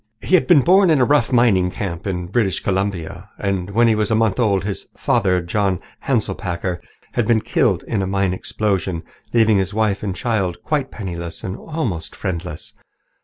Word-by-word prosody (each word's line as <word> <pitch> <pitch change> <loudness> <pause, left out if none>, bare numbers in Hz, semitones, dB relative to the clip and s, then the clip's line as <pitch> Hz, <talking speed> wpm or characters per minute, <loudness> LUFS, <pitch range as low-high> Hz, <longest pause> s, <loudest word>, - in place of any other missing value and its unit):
He - - -4
had 185 - +5
been 170 -6 +6
born 185 +4 +5
in 155 -4 +4
a 125 - +5
rough 145 +1 +2
mining 110 -7 +4
camp 90 0 -5
in 90 -2 -2
British 95 -1 0
Columbia, 95 -1 -3
and 100 -2 -2
when 115 +4 +3
he 115 - +4
was 105 -1 0
a 110 - +2
month 110 -1 +1
old 100 -5 +2
his 100 0 -4
father, 90 -2 +1
John 95 0 0 0.3
Hanselpakker, 85 0 -1 0.3
had 120 -3 0
been 115 -2 +3
killed - - +1
in 105 - -1
a 95 - -1
mine 95 -1 0
explosion, 95 -3 -2 0.3
leaving 110 -3 +4
his 95 +1 -2
wife 110 -2 +1
and 95 -3 -3
child 95 -6 -1
quite 145 -4 -1
penniless 85 -5 -6
and 95 - -4
almost 115 - -4
friendless. 90 -5 -5
100 Hz, 180 wpm, -20 LUFS, 90-115 Hz, 0.3 s, been